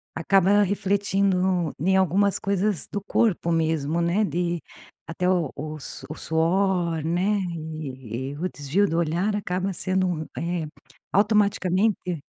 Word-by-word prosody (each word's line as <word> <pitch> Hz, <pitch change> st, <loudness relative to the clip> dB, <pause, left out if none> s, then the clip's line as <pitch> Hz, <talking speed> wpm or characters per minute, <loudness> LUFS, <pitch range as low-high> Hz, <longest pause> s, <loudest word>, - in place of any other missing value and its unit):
Acaba 195 Hz, +4 st, +4 dB
refletindo 190 Hz, -3 st, +1 dB
em 190 Hz, +6 st, +2 dB
algumas 190 Hz, +2 st, +3 dB
coisas 200 Hz, -2 st, 0 dB
do 205 Hz, -, -2 dB
corpo 200 Hz, -3 st, +1 dB
mesmo, 160 Hz, -1 st, +1 dB
né, 175 Hz, +6 st, +2 dB
de 175 Hz, -2 st, -1 dB, 0.5 s
até 180 Hz, +3 st, -1 dB
o 175 Hz, -6 st, +1 dB
o 155 Hz, +1 st, -6 dB
su -, -, -8 dB
o 155 Hz, -, -5 dB
suor, 170 Hz, +1 st, +1 dB
né, 185 Hz, +5 st, +1 dB, 0.2 s
e 135 Hz, -6 st, -6 dB
e 145 Hz, -, -8 dB
o 180 Hz, +4 st, -2 dB
desvio 145 Hz, +8 st, 0 dB
do 165 Hz, -, -1 dB
olhar 170 Hz, +5 st, 0 dB
acaba 190 Hz, -1 st, -2 dB
sendo 185 Hz, +1 st, 0 dB
um 165 Hz, -3 st, -2 dB
eh, 170 Hz, -2 st, -2 dB, 0.5 s
automaticamente 200 Hz, -3 st, +2 dB
180 Hz, 135 wpm, -25 LUFS, 160-195 Hz, 0.5 s, Acaba